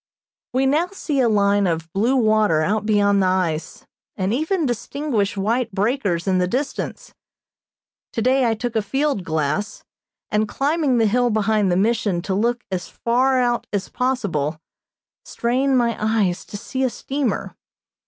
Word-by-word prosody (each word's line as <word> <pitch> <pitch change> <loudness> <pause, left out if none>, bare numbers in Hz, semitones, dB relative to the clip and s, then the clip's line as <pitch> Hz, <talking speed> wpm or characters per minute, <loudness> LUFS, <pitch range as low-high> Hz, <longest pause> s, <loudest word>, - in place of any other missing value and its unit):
We 260 +2 +1
now 300 +6 +2
see 330 -7 -3
a 245 -3 +3
line 200 -1 +3
of 165 -1 -3
blue 230 +7 +2
water 215 -9 +3
out 210 +4 0
beyond 205 -2 +3
the 185 - +3
ice, 180 -4 -1 0.3
and 190 +1 0
even 320 +5 0
distinguish 240 -3 -2
white 225 +4 0
breakers 200 -4 0
in 185 -2 +2
the 180 - +1
distance. 270 +7 -4 1.0
Today 255 +2 +2
I 225 - +1
took 240 +1 -4
a 220 - +3
field 270 0 -1
glass, 160 +5 -2 0.5
and 210 +1 +1
climbing 285 -2 +1
the 225 - +3
hill 245 +3 +2
behind 215 -2 +1
the 175 - +2
Mission 205 -4 +1
to 195 - -2
look 235 +5 0
as 180 -2 -3
far 255 +3 +1
out 240 -1 0
as 200 -2 -2
possible, 200 - -1 0.7
strained 260 +3 0
my 235 -2 +1
eyes 210 -5 0
to 205 - -7
see 260 +5 -5
a 260 - +2
steamer. 270 +1 -3
220 Hz, 155 wpm, -21 LUFS, 195-255 Hz, 1.0 s, a